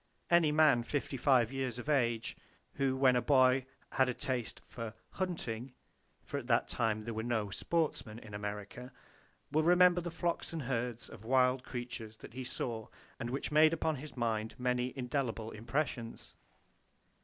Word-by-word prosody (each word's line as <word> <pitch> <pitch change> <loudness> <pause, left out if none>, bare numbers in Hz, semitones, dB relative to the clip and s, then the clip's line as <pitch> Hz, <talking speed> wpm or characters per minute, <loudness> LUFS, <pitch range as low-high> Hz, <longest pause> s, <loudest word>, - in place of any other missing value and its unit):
Any 170 -3 +5
man 150 -5 +5
55 130 -1 +1
years 130 -3 -2
of 120 - -7
age 120 -6 +1 0.4
who 135 -2 +1
when 130 -2 +5
a 125 - +3
boy 130 0 +4 0.2
had 130 -1 +3
a 125 - -2
taste 125 -3 -2
for 115 -2 -7 0.2
"hunting,"—for 130 -9 -6
at - - -10
that - - +3
time 110 -2 0
there 115 +1 -4
were 110 - -2
no 110 -3 -1
"sportsmen" 145 -4 -1
in 110 -3 -11
America,—will 105 +8 -5
remember 180 +1 +6
the 175 - -4
flocks 170 0 -2
and 160 -3 -3
herds 120 -2 -2
of 110 -2 -12
wild 125 +1 +3
creatures 120 -4 -6
that - - -12
he 130 +1 -5
saw 115 -3 -4 0.3
and 120 -2 -3
which 135 +4 -3
made 155 +1 +6
upon 160 -2 0
his 145 0 -9
mind 110 -2 -1
many 125 0 0
indelible 125 -3 -2
impressions. 120 +1 -3
125 Hz, 155 wpm, -33 LUFS, 115-145 Hz, 0.4 s, remember